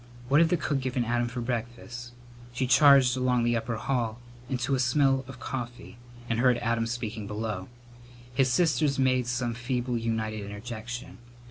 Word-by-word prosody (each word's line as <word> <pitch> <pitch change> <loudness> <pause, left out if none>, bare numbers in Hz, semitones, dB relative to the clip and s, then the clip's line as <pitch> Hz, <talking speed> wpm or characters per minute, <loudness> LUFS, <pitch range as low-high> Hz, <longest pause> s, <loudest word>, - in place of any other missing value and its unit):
What 145 +4 +6
had 165 - +4
the 175 - +2
cook 145 -2 -1
given 130 -2 -1
Adam 120 +1 +1
for 120 +1 -4
breakfast? 120 0 -5 0.4
She 130 +2 0
charged 135 -1 +6
along 125 -2 +1
the 120 0 +2
upper 115 0 -2
hall 115 -1 -1 0.3
into 130 +1 -1
a 130 - +2
smell 135 +1 +3
of 130 -2 -10
coffee, 120 -1 -6 0.3
and 115 -1 0
heard 125 -1 +4
Adam 115 -1 0
speaking 115 -3 -4
below. 105 -2 -4 0.6
His 125 0 +2
sisters 155 -1 +2
made 130 -2 +2
some 120 -1 -1
feeble 120 0 -2
united 110 -2 -2
interjection. 115 +5 -7
120 Hz, 160 wpm, -28 LUFS, 115-130 Hz, 0.6 s, What